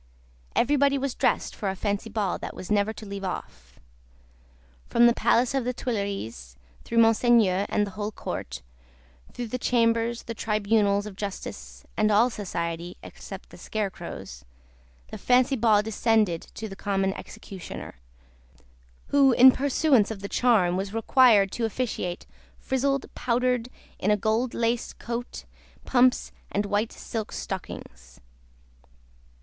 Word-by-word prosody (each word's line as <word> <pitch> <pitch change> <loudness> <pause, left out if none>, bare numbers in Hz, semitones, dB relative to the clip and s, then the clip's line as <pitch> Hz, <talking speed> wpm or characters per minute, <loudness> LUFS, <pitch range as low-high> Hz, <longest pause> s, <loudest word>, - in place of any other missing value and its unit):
Everybody 280 +2 +3
was 275 -1 -2
dressed - - 0
for 200 - -2
a 190 - -3
Fancy 205 +2 -2
Ball 205 -4 -1
that - - -7
was 185 - -8
never 205 +1 +2
to 220 0 -10
leave 200 -1 -6
off. 65 - -7 1.1
From 235 - +5
the 235 - +6
Palace 245 +1 +2
of 270 -2 0
the 250 +1 -1
Tuileries, 200 - -4 0.3
through 230 - -4
Monseigneur 225 -4 +4
and 210 - +1
the 200 - -8
whole 210 +2 -4
Court, - - -6 0.7
through 245 - -5
the 250 - -3
Chambers, 230 -1 +1
the 230 - -5
Tribunals 210 -2 +1
of 210 -2 -8
Justice, 60 - -7
and 215 0 +2
all 220 +4 +4
society 170 -4 -4
(except - - -10
the - - -13
scarecrows), 195 - -5 0.7
the - - -7
Fancy 255 +2 +3
Ball 215 -3 +4
descended 215 -5 +1
to 220 - -5
the 195 - -8
Common 195 -1 0
Executioner: 185 - -9 1.1
who, 275 -2 +5
in 260 +2 +9
pursuance 270 -4 +2
of 215 -3 -6
the 200 - -4
charm, 200 -7 +3
was 195 +2 -4
required 225 -4 +5
to 235 - -1
officiate 215 -6 -3 0.3
"frizzled, 275 +1 0
powdered, 250 0 0 0.3
in 195 - 0
a 210 - +4
gold 220 +4 0
laced 235 0 -1
coat, 240 +1 -5 0.4
pumps, 250 0 +3 0.2
and 205 +1 0
white 205 +2 0
silk 220 -2 -5
stockings." 65 - -7
215 Hz, 140 wpm, -26 LUFS, 195-240 Hz, 1.1 s, in